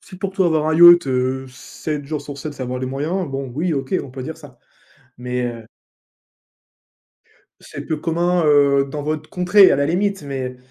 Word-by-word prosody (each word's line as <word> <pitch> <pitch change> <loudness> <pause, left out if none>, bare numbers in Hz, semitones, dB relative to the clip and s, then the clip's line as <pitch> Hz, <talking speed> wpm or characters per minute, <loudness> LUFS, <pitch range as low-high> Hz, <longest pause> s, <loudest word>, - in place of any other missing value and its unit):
si 185 - -14
pour 195 -1 -4
toi 190 -2 +1
avoir 155 -2 +1
un 160 - +1
yacht, 175 -2 +8
heu, 130 +1 -1
7 145 +3 -7
jours 150 +1 -4
sur 145 -1 -9
7, 150 +2 -6
c'est 135 - -8
avoir 125 0 -4
les 130 - -4
moyens, 155 +7 -3
bon 135 -1 -4
oui, 165 +3 -1
OK 135 +4 -3
on 135 - -10
peut 130 0 -8
dire 160 +4 -7
ça, - - -15 0.6
mais, 125 0 -3
heu 115 -1 -11 2.0
C'est - - -9
peu 155 -2 -3
commun, 175 +2 0
heu, 140 -2 +3
dans 145 0 -5
votre 155 +1 -4
contrée 185 +2 +5
à - - +3
la 140 - +1
limite, 195 +1 -1
mais 130 -3 -5
150 Hz, 195 wpm, -20 LUFS, 135-175 Hz, 2.0 s, yacht